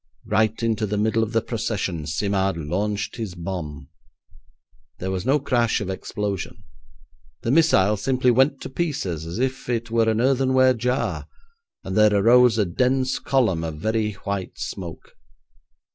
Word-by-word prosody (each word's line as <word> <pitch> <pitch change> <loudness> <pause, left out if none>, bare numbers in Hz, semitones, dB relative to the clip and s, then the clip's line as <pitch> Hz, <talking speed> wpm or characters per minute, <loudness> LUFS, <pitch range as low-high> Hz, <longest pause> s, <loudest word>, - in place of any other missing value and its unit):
Right 110 +1 +1
into 110 -1 0
the 105 +1 -2
middle 110 +2 +1
of 110 0 -1
the 115 -1 +1
procession 100 -9 -3
Simard 95 +3 0
launched 100 +8 -2
his 110 -6 -5
bomb. 80 -6 -6 1.1
There 95 +1 -3
was 95 +5 -3
no 140 +3 +4
crash 120 -5 +1
of 95 -2 -3
explosion. 100 0 -4 0.8
The 115 - 0
missile 105 -10 +4
simply 130 +3 +2
went 135 +3 +2
to - - -6
pieces 100 - -3
as 85 - -5
if 130 +1 -2
it 115 -1 -2
were 115 -1 +3
an 110 0 +1
earthenware 130 0 +3
jar, 125 +3 -2 0.6
and 95 - -5
there 105 -1 +5
arose 120 +3 +5
a 105 - +3
dense 130 +7 0
column 110 -12 +1
of 80 -2 -4
very 110 +4 -1
white 100 -1 -5
smoke. 85 -4 -7
110 Hz, 150 wpm, -23 LUFS, 95-125 Hz, 1.1 s, there